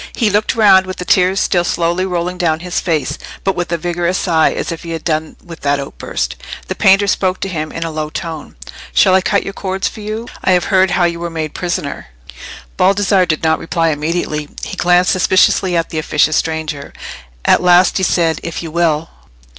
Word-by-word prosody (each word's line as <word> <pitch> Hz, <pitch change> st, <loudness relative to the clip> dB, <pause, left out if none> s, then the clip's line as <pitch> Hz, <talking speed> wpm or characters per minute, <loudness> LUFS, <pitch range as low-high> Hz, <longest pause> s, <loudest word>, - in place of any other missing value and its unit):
He 220 Hz, -4 st, +1 dB
looked 210 Hz, +2 st, +1 dB
round 195 Hz, -4 st, +5 dB
with 185 Hz, -, -6 dB
the 180 Hz, -, -5 dB
tears 185 Hz, +1 st, +3 dB
still 175 Hz, -1 st, +1 dB
slowly 175 Hz, +2 st, 0 dB
rolling 180 Hz, 0 st, -3 dB
down 160 Hz, -3 st, 0 dB
his 180 Hz, 0 st, -2 dB
face, 160 Hz, -5 st, -2 dB, 0.2 s
but 195 Hz, -, 0 dB
with 175 Hz, -1 st, -3 dB
a 170 Hz, -, +1 dB
vigorous 175 Hz, +2 st, -1 dB
sigh, 160 Hz, -3 st, +2 dB
as -, -, -3 dB
if 165 Hz, -, -6 dB
he 165 Hz, -1 st, -6 dB
had 160 Hz, -, -5 dB
done 155 Hz, -1 st, -2 dB
with 165 Hz, -1 st, -10 dB
that 145 Hz, 0 st, 0 dB
outburst. 140 Hz, -, -4 dB, 0.3 s
The -, -, 0 dB
painter 195 Hz, +1 st, +4 dB
spoke 185 Hz, -1 st, 0 dB
to -, -, -1 dB
him 155 Hz, -4 st, -4 dB
in 165 Hz, -, -4 dB
a 165 Hz, -, -4 dB
low 155 Hz, -1 st, -3 dB
tone— 160 Hz, -1 st, -6 dB, 0.4 s
"Shall 185 Hz, -, +5 dB
I 190 Hz, -, +5 dB
cut 200 Hz, +2 st, +1 dB
your 195 Hz, -, -6 dB
cords 190 Hz, -1 st, -2 dB
for 215 Hz, -, -8 dB
you? 215 Hz, +3 st, -5 dB, 0.2 s
I 190 Hz, -, +3 dB
have 180 Hz, -, +2 dB
heard 190 Hz, 0 st, +4 dB
how 180 Hz, -, +1 dB
you 170 Hz, -1 st, 0 dB
were 170 Hz, 0 st, -4 dB
made 155 Hz, -2 st, -4 dB
prisoner." 175 Hz, -5 st, -4 dB, 0.7 s
Baldassarre 195 Hz, -1 st, +3 dB
did 155 Hz, 0 st, -1 dB
not 160 Hz, 0 st, +2 dB
reply 165 Hz, 0 st, 0 dB
immediately; 150 Hz, -1 st, -2 dB
he -, -, -5 dB
glanced 180 Hz, +1 st, +3 dB
suspiciously 185 Hz, -1 st, +3 dB
at 165 Hz, -, -2 dB
the 160 Hz, -, -2 dB
officious 155 Hz, 0 st, +1 dB
stranger. 160 Hz, -3 st, -3 dB, 0.5 s
At -, -, +4 dB
last 180 Hz, 0 st, +4 dB
he 190 Hz, -, -1 dB
said, 165 Hz, -2 st, +1 dB
"If 170 Hz, 0 st, -5 dB
you 165 Hz, -, -6 dB
will." 165 Hz, -1 st, +1 dB
175 Hz, 210 wpm, -16 LUFS, 160-185 Hz, 0.7 s, round